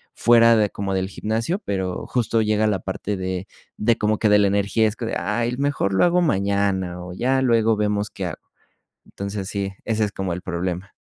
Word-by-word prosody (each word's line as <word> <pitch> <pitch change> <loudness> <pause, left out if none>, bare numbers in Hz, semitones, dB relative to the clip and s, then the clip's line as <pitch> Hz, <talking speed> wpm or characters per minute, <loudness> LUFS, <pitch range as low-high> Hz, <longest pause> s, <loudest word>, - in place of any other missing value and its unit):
fuera 115 0 +5
de 105 -1 +2
como 100 -1 -4
del 95 0 0
gimnasio, 115 - -2
pero 95 -2 -2
justo 115 -2 +1
llega 110 0 +2
la 100 -3 0
parte 95 +2 -4
de 95 +1 -4 0.3
de 115 +1 +2
como 105 0 0
que 110 - +2
de 105 - +6
la 100 - +4
energía, 100 +3 +1
es 105 - -3
como 115 -1 -4
de: - - -1
"Ay, 115 +6 -1
mejor 140 -8 0
lo 95 - +3
hago 175 +1 +3
mañana 100 - 0
o 90 0 -8
ya 130 +7 +1
luego 115 -3 +3
vemos 105 -1 0
qué 95 - -5
hago", 80 - -6 0.7
entonces, 100 -1 -5
sí, 100 -1 -3
ese 110 -1 +1
es 105 - -3
como 95 -3 -3
el 90 - -7
problema. 90 +2 -4
105 Hz, 205 wpm, -22 LUFS, 95-115 Hz, 0.7 s, de